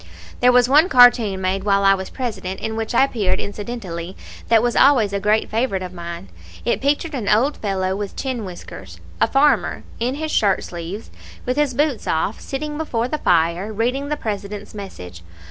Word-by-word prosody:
There 250 0 +5
was 245 0 +5
one 300 +7 +5
cartoon 245 -6 +5
made 190 +1 -1
while 200 -1 +2
I 195 0 +6
was 190 -1 -4
President, 205 -7 -4
in 220 - -4
which 225 +1 -3
I 265 - +6
appeared 220 -8 0
incidentally, 200 -5 -6 0.3
that 225 -1 +4
was 240 -1 0
always 240 -8 +4
a 200 - 0
great 210 +2 +1
favorite 220 -5 -1
of 180 0 -7
mine. 170 - -7 0.4
It - - 0
pictured 290 +3 0
an 235 -7 -2
old 250 +8 +2
fellow 190 -2 -1
with 200 0 -5
chin 255 -4 -3
whiskers, 95 - -10 0.2
a - - +5
farmer, 285 +2 +2 0.2
in 245 +3 -1
his 310 +1 -4
shirt 200 -3 +2
sleeves, 175 +5 -7 0.3
with 250 - 0
his 290 -3 0
boots 290 -3 0
off, 160 +6 -1
sitting 295 +2 -5
before 240 -7 -1
the 305 - -2
fire, 175 +3 +1
reading 250 +6 -1
the 300 - -1
President's 205 -3 -5
Message. 90 - -9
215 Hz, 185 wpm, -21 LUFS, 190-255 Hz, 0.4 s, I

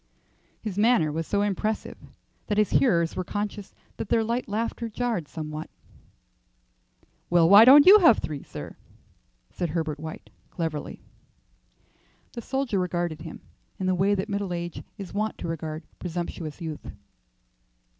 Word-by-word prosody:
His 205 -3 -4
manner 210 -9 +3
was 160 +1 -3
so 205 0 +1
impressive 210 +2 -2 0.5
that 210 - -1
his 210 -1 +2
hearers 170 -10 +2
were 185 - -2
conscious 205 +1 -5 0.2
that - - -5
their 225 - +3
light 235 +3 -2
laughter 230 +2 -2
jarred 225 -8 -2
somewhat. 155 0 -6 1.6
"Well, 170 -1 +5
why 200 +5 +9
don't 285 +3 +9
you 410 +3 +10
have 325 - +6
three, 145 -3 -5
sir?" - - -9 0.8
said 175 - -3
Herbert 155 -2 -2
White, 160 0 -8 0.2
cleverly. 160 -4 -5 1.3
The 235 - -6
soldier 265 -4 -1
regarded 175 -3 -2
him 160 0 -9 0.4
in 190 - -3
the 185 - +2
way 195 +3 +2
that 190 +1 -2
middle 200 -3 -2
age 170 -1 -5
is 195 -4 -8
wont 215 +2 -2
to - - -5
regard 160 -1 -5 0.2
presumptuous 170 -2 -5
youth. 160 -2 -6
185 Hz, 145 wpm, -26 LUFS, 165-215 Hz, 1.6 s, you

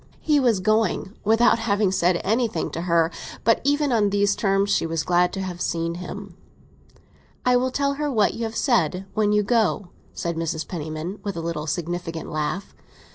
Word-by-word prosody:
He 300 -2 +3
was 240 -7 +3
going, 215 -1 +1
without 225 +3 +4
having 205 -3 +1
said 175 -1 +2
anything 225 +2 0
to 165 - -4
her; 170 -1 +2 0.3
but 230 0 +3
even 290 0 +2
on 215 -4 +3
these 200 0 +2
terms 195 0 +1
she 165 - +2
was 165 -1 -1
glad 180 +1 +2
to 195 - -3
have 180 -2 -5
seen 165 0 -1
him. 195 0 -8 1.1
"I 250 0 +4
will 255 +1 +2
tell 280 +2 0
her 295 -1 0
what 215 -5 +2
you 230 - -4
have 225 0 -5
said—when 205 - +1
you 210 0 +3
go!" 215 -4 +1 0.2
said 170 -1 -3
Mrs. 160 -1 -2
Penniman, 160 +3 -5
with 200 -4 -4
an 165 - -4
insinuating 165 +1 -3
laugh. 155 +6 -3
195 Hz, 175 wpm, -23 LUFS, 170-225 Hz, 1.1 s, without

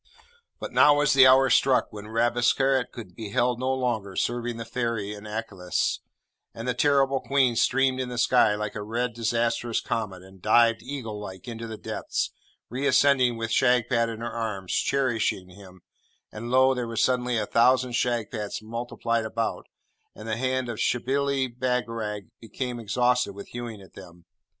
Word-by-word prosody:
But - - -6
now 145 - +6
was 145 -1 +3
the 135 -1 +8
hour 130 0 +5
struck 130 -3 +3
when 105 0 -8
Rabesqurat 120 +3 +1
could 100 -7 -10
be 110 -2 -7
held 120 +3 +1
no 130 +1 0
longer 120 -7 -2
serving 120 0 -2
the 115 - -6
ferry 115 -4 -2
in 105 0 -10
Aklis; 105 -4 -2 0.6
and 115 +2 -6
the 125 - +1
terrible 135 +1 +2
Queen 130 -4 +2
streamed 130 +2 +2
in 130 -1 -3
the 125 - -6
sky, 120 -3 +4
like 105 0 -4
a 105 - -5
red 120 +3 -2
disastrous 115 0 0
comet, 100 -5 -4
and 95 0 -16
dived, 115 +1 +4
eagle 115 -5 -6
like, 95 +1 -9
into 115 -1 -6
the 110 -1 -7
depths, - - -3 0.4
re 130 +4 -2
ascending 130 -2 +4
with 115 0 -4
Shagpat 120 -2 +2
in 115 0 -6
her 120 - -4
arms, 105 -5 -4
cherishing 120 -9 0
him; 95 -1 -15 0.5
and 115 +2 -7
lo, 130 +1 +4
there 125 -2 -3
were 115 - -6
suddenly 125 0 +1
a 105 - 0
thousand 125 +3 +3
Shagpats 115 -3 -2
multiplied 115 0 -3
about, 115 +1 -3 0.5
and 110 - -10
the 110 - -1
hand 130 0 -1
of 115 -3 -5
Shibli 135 +2 0
Bagarag 115 -5 -3
became 120 +2 -5
exhausted 125 0 +1
with 100 - -10
hewing 120 -4 -7
at 95 - -18
them. 85 -2 -14
120 Hz, 170 wpm, -26 LUFS, 110-125 Hz, 0.6 s, the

